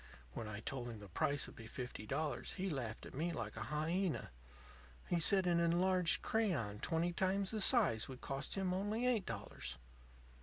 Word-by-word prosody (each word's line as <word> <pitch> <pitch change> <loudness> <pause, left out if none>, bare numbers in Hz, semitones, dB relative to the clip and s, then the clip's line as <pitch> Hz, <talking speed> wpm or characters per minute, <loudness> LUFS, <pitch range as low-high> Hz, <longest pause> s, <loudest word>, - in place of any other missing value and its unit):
When 110 - -4
I 105 0 -5
told 125 0 -4
him 115 - -6
the 105 -1 -10
price 140 - +1
would - - -10
be 115 - -9
fifty 125 -2 -6
dollars 145 0 -1
he 190 -1 -2
laughed 120 -7 -4
at - - -10
me 160 +6 -1
like 165 - -4
a - - -4
hyena. 165 +4 -1 0.8
He 175 - +1
said 190 +3 +6
an 175 -1 +3
enlarged 175 +1 +3
crayon 155 - 0
twenty 170 +4 0
times 190 +2 +1
the 220 -2 -1
size 195 - +4
would 130 -2 -8
cost 135 +1 -3
him 190 -2 0
only 205 +6 0
eight 235 -6 +2
dollars. 100 - -4
165 Hz, 185 wpm, -38 LUFS, 120-190 Hz, 0.8 s, said